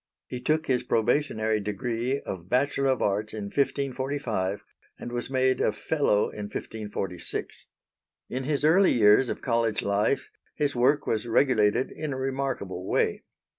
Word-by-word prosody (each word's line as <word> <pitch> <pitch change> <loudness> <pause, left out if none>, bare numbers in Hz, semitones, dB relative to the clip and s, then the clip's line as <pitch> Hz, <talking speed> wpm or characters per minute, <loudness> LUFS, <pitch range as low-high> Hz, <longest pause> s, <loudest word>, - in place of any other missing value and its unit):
He 125 - -6
took 155 +5 +1
his 125 -2 +1
probationary 110 -2 +1
degree 120 +5 -2
of 90 -2 -7
Bachelor 135 +2 +1
of 130 -2 +1
Arts 105 +2 -1
in 105 - -4
1545, 130 -8 -1 0.3
and 120 - -7
was 120 +1 -3
made 130 -1 +2
a - - +3
Fellow 105 -1 +1
in 105 - -6
1546. 100 -4 -5 0.6
In 130 +1 -4
his 145 0 0
early 185 +5 +5
years 105 +3 +5
of - - -4
College 115 -3 +1
life 100 +6 0 0.2
his 145 -2 0
work 130 +5 +3
was 110 +1 -1
regulated 115 -1 +3
in 155 -2 -4
a - - -4
remarkable 130 -9 -3
way. - - +1
120 Hz, 145 wpm, -27 LUFS, 105-135 Hz, 0.6 s, early